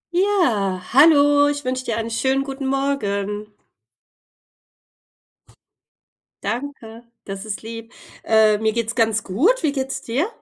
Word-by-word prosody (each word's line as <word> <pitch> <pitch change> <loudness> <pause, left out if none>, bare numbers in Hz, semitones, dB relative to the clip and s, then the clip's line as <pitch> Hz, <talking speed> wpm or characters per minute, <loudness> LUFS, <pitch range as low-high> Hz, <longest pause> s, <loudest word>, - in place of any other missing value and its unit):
Ja, 250 - +1
hallo. 290 0 +6
Ich 290 -1 -4
wünsche 255 0 -2
dir 230 -2 -2
einen 230 0 -3
schönen 265 +4 0
guten 270 0 -5
Morgen. 210 -7 -2 2.9
Danke, 235 0 -5 0.2
das 195 +1 -7
ist 215 -2 -5
lieb, 230 0 -9 0.3
äh, 220 -1 +4
mir 220 0 0
geht's 230 0 -2
ganz 220 -2 +1
gut. 335 - +1
Wie 305 - +2
geht's 270 -1 -4
dir? 270 - -1
235 Hz, 120 wpm, -21 LUFS, 220-280 Hz, 2.9 s, hallo